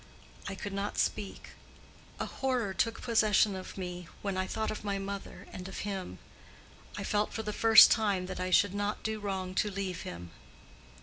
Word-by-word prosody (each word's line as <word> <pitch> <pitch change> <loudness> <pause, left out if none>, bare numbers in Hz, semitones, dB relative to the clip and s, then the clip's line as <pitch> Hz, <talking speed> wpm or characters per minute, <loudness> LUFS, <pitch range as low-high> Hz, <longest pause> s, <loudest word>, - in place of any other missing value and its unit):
I 200 - -4
could 200 +1 -6
not 200 +1 -3
speak: 200 - -2 0.7
a - - -1
horror 250 -7 -1
took 230 +3 -1
possession 215 -4 +3
of 185 +1 -8
me 180 -2 -5 0.2
when 200 -2 -1
I 185 0 -1
thought 220 +2 -2
of 215 - -6
my 200 -1 -1
mother 195 0 -6
and 185 0 -6
of 190 - -6
him. 195 -3 -4 0.8
I - - -3
felt 210 0 0
for 220 - -3
the 210 -1 -3
first 225 0 +9
time 200 -5 +2
that 185 - -6
I 185 0 -1
should 195 +1 +4
not 205 +1 -2
do 220 0 -2
wrong 190 -2 -3
to 210 - +1
leave 190 -3 -4
him. 85 0 -7
200 Hz, 185 wpm, -31 LUFS, 185-210 Hz, 0.8 s, first